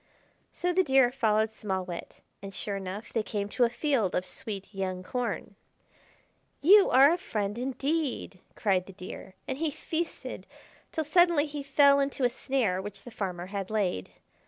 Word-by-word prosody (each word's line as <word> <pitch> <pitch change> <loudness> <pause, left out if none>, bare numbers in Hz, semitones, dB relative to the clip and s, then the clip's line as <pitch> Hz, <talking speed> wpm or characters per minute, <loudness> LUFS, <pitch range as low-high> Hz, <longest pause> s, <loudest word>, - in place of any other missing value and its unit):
So 360 0 -1
the 375 - +4
Deer 265 -5 +4
followed 220 -4 +2
Small 190 -4 -3
Wit, 175 -1 -8 0.2
and, 195 -1 -8
sure 200 - -3
enough, 195 +3 -6
they 225 - +2
came 205 -1 -3
to 245 - +3
a - - +1
field 240 - 0
of 180 - 0
sweet 200 +1 -6
young 185 -1 -3
corn. 245 +5 -3 1.0
"You 395 +6 +7
are 275 +5 +7
a 350 - -2
friend 205 - -2
indeed!" 270 - -2 0.2
cried 190 -4 +1
the 195 - -10
Deer, 185 +1 -9
and 265 +1 -3
he 325 -1 +1
feasted 325 +3 -4 0.4
till 315 - -1
suddenly 335 0 +4
he 295 -1 -5
fell 280 0 +5
into 275 -1 -1
a 245 - +5
snare 235 -8 0
which 205 0 -8
the 245 - -10
farmer 180 -5 -4
had 195 -2 -3
laid. 190 - -1
230 Hz, 170 wpm, -29 LUFS, 195-280 Hz, 1.0 s, You